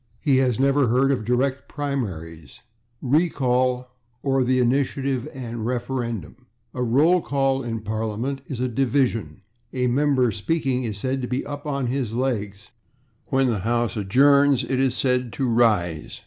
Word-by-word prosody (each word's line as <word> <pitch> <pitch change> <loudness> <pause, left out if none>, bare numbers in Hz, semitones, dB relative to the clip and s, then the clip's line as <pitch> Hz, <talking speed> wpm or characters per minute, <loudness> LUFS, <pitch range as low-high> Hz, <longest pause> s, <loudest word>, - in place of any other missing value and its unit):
He 140 -4 +2
has 130 -3 +1
never 140 0 +3
heard 130 +4 +3
of 125 -5 -1
/direct 130 +3 0
primaries/, 90 - -5 0.4
the - - -4
/recall/ 125 -6 0 0.4
or 135 -1 +2
the 130 +1 +2
/initiative 135 +1 0
and 120 -5 -6
referendum/. 120 - -4 0.3
A - - -7
/roll 145 +9 +3
call/ 135 -1 0
in 115 -3 -4
Parliament 110 +5 -3
is 130 - -5
a 130 - 0
/division/. 125 -2 0 0.3
A 125 -1 0
member 130 -1 +2
speaking 130 - -1
is 105 -3 -4
said 130 +5 -2
to 125 - -3
be 125 +2 -1
/up/ 145 +1 -7
or 140 -1 -1
/on - - -1
his 125 -3 -2
legs/. 105 -6 -3 0.6
When 135 -1 +2
the 115 -5 0
house 120 +3 0
adjourns 140 +6 +4
it 130 +1 -1
is 130 -1 +1
said 125 -2 +1
to 135 - -1
/rise 105 -10 +1
125 Hz, 160 wpm, -23 LUFS, 115-135 Hz, 0.6 s, adjourns